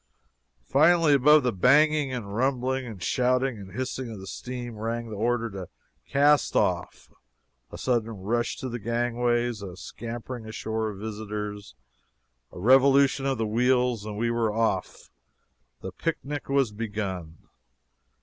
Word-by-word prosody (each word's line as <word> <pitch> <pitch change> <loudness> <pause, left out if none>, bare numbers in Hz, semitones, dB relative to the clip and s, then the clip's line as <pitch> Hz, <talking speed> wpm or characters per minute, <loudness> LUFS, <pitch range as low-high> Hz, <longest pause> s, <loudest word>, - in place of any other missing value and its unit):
Finally, 160 +2 +4
above 150 +2 +6
the 125 -2 +1
banging, 145 +7 +4
and 105 -6 -5
rumbling, 130 +1 0
and 105 -6 -8
shouting, 125 -2 +1
and 95 -2 -11
hissing 130 +1 -4
of 100 -4 -8
steam 120 0 -6
rang 115 +1 -4
the - - -5
order 115 +2 0
to 95 -5 -8 0.4
"cast 145 +1 +3
off!" - - -1 0.6
a - - -8
sudden 120 -3 0
rush 115 +3 -2
to 130 - -5
the 120 -1 -4
gangways 120 0 0
a 95 -3 -8
scampering 115 +4 -7
ashore 110 0 -3
of 100 - -8
visitors 105 -3 -6 0.8
a - - -12
revolution 135 +5 +4
of 135 -2 0
the 110 - -1
wheels, 125 0 +1
and 105 -1 -6
we 115 +2 0
were 115 -2 +1
off 115 +1 -2 0.7
the 95 - -6
pic 165 - -2
nic 145 0 -5
was 135 -5 +2
begun! 100 -7 -5
120 Hz, 140 wpm, -26 LUFS, 105-130 Hz, 0.8 s, above